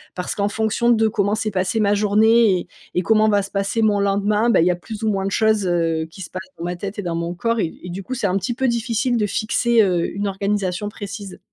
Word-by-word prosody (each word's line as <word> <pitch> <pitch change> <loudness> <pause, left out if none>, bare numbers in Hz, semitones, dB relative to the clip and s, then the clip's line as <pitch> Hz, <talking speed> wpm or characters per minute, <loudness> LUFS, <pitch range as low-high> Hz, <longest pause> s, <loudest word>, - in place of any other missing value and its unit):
Parce 180 - -3
qu'en 200 0 0
fonction 220 +3 0
de 225 -1 +3
comment 205 -1 0
s'est 220 0 -2
passée 185 +3 0
ma 205 -1 +3
journée 210 0 +4
et - - -8 0.3
et 180 - +1
comment 215 +4 +3
va 205 -1 +3
se 195 - -8
passer 200 +3 -1
mon 210 -2 +3
lendemain, 205 +3 +1
beh, 200 -7 +4
il - - +3
y - - +4
a - - -1
plus 210 +5 -8
ou 220 - +2
moins 195 -2 -1
de 195 - -2
choses, 220 -2 +2
heu, 165 -2 0
qui 190 - -12
se 180 - -7
passent 185 - -6 0.2
dans - - -7
ma 175 0 -3
tête 200 +3 -6
et - - -1
dans 170 -2 -2
mon 170 +1 -3
corps 230 +6 -1
et 165 - -1
et 180 - -7
du 180 +3 -5
coup, 255 - -5
c'est 245 -5 -1
un 185 +1 +1
petit 195 +5 -2
peu 265 +2 0
difficile 235 +1 0
de 215 - +1
fixer, 230 +3 +2
heu, 180 -4 +1
une 200 +1 -2
organisation 200 0 -2
précise. 205 -2 -8
205 Hz, 270 wpm, -21 LUFS, 185-220 Hz, 0.3 s, journée